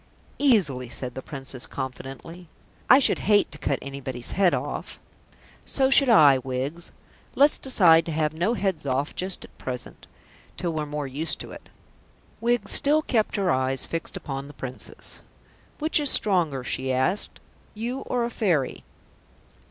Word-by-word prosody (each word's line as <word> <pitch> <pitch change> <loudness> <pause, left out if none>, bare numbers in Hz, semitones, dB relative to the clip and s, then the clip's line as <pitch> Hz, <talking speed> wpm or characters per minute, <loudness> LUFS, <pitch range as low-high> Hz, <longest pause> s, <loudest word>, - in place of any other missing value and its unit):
"Easily," 175 - +2
said 125 +1 -5
the 130 - -6
Princess 135 -2 -8
confidently. 135 +6 -7 0.4
"I 255 - +10
should 275 - +2
hate 205 -1 +4
to 145 - -11
cut 135 - 0
anybody's 130 -3 -5
head 190 -2 +3
off." - - -4 0.7
"So 265 -1 +1
should 275 -1 +5
I, 145 - +7
Wiggs. 135 +6 -4 0.4
Let's 290 +2 +4
decide 170 -11 +5
to - - -2
have 155 -1 0
no 180 +9 0
heads 190 -9 -2
off 135 +2 -1
just 185 +1 -2
at - - -20
present 125 -1 -7 0.5
till 170 -2 -2
we're 155 -1 -2
more 150 0 -3
used 145 +5 -4
to - - -8
it." - - -12 0.7
Wiggs 235 -3 +1
still 300 +2 +4
kept 225 -7 0
her 195 -3 +1
eyes 130 0 0
fixed 165 0 -4
upon 135 0 -5
the 145 - -11
Princess. 130 -2 -6 0.6
"Which 310 +1 +2
is 290 -2 +1
stronger," 170 - +1
she 130 +1 -2
asked, 130 +11 -1 0.4
"you 240 +5 -3
or 245 -1 0
a 240 - -4
Fairy?" 170 - 0
160 Hz, 155 wpm, -25 LUFS, 135-210 Hz, 0.7 s, I